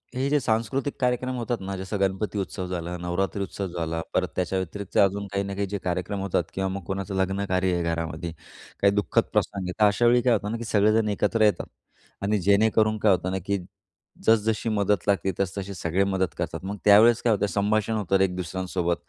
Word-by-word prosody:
हे 135 +2 0
जे 145 0 +3
सांस्कृतिक 120 +4 -1
कार्यक्रम 125 0 0
होतात 120 0 -2
ना, 95 +1 -4
जसं 95 +2 -4
गणपती 100 +2 -1
उत्सव 95 -1 -4
झाला, 90 -1 -4
नवरात्री 90 +3 -2
उत्सव 95 +1 -4
झाला, 80 -1 -3
परत - - +1
त्याच्याव्यतिरिक्त 95 +1 -3
अजून 100 0 +3
काही 100 0 0
ना 100 0 -5
काही 100 0 -1
जे 100 +1 -3
कार्यक्रम 90 +3 -2
होतात 90 -3 0
किंवा 95 0 -1
मग 95 -1 -5
कोणाचं 95 0 -4
लग्न 95 +1 0
कार्य 90 0 +1
आहे 85 -1 0
घरामध्ये. 85 0 -3 0.5
काही 100 0 +4
दुःखद 105 0 +2
प्रसंग 100 -1 0
आहे. - - -2
तर 105 - +6
अशावेळी 120 +4 +4
काय 125 -1 +3
होतं 105 0 -1
ना, 115 - -2
की 120 - -6
सगळेजण 110 +1 +3
एकत्र 105 +2 0
येतात 105 -1 +3 0.5
आणि 105 +1 +1
जेणेकरून 110 +2 +3
काय 105 -1 +4
होतं 90 0 +1
ना, 95 - -1
की 100 0 0 0.7
जसं-जशी 110 0 +2
मदत 105 -2 +1
लागते 100 -1 +2
तसतशी 100 +1 -2
सगळे 90 +1 0
मदत 95 -2 0
करतात. - - -3
मग 100 +1 -4
त्यावेळेस 110 +3 +7
काय 115 -2 +3
होतं, 105 - +1
संभाषण 105 +3 0
होतं 95 -2 +1
एक 90 -2 +1
दुसऱ्यांसोबत. 90 -1 -2
100 Hz, 200 wpm, -25 LUFS, 95-105 Hz, 0.7 s, त्यावेळेस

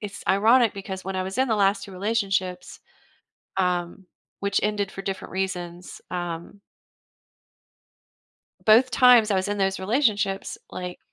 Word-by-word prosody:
It's 205 -2 -7
ironic 225 +4 +4
because 190 -1 -7
when 190 0 -4
I 185 - 0
was 190 +3 -5
in 260 0 +2
the 220 - +1
last 195 0 +2
2 195 - -11
relationships, 190 -3 -2 0.8
um- 180 0 -1 0.3
which 200 0 0
ended 205 -2 -1
for 195 - -8
different 195 -1 -5
reasons- 180 -2 -5
um 175 +2 -5 2.1
both 230 +4 +6
times 245 -3 +6
I 200 - +2
was 190 +1 -1
in 205 - -1
those 195 0 0
relationships, 205 -3 0
like, 180 -1 -6
195 Hz, 140 wpm, -24 LUFS, 185-210 Hz, 2.1 s, both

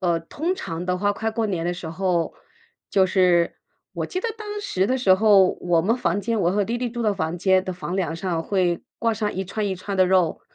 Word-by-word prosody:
呃， 170 -2 +1
通 315 - -3
常 175 - -5
的 180 0 0
话， 205 +1 +1
快 220 +2 -2
过 225 0 0
年 175 -5 -2
的 175 - -1
时 175 -2 -7
候 175 0 0 0.6
就 190 -1 +4
是 180 -2 +3 0.4
我 - - -3
记 370 - -3
得 465 - -2
当 420 -1 -5
时 190 - 0
的 255 - +1
时 220 -7 +4
候， 200 -2 +5
我 170 -2 +2
们 225 +7 +2
房 200 -6 0
间 225 +1 -1
我 175 -1 +2
和 205 +1 +1
弟 235 +4 -2
弟 250 - -1
住 240 0 -4
的 215 -2 +2
房 175 -3 -2
间 190 +1 +3
的 185 - -3
房 180 0 -5
梁 170 -5 -1
上 170 -2 -2
会 180 -4 0 0.2
挂 230 -1 +2
上 210 -1 -2
一 190 - -2
串 205 +3 -3
一 195 - -1
串 195 +2 -5
的 185 -1 +4
肉， 180 -3 +2
190 Hz, 260 characters per minute, -23 LUFS, 175-215 Hz, 0.6 s, 候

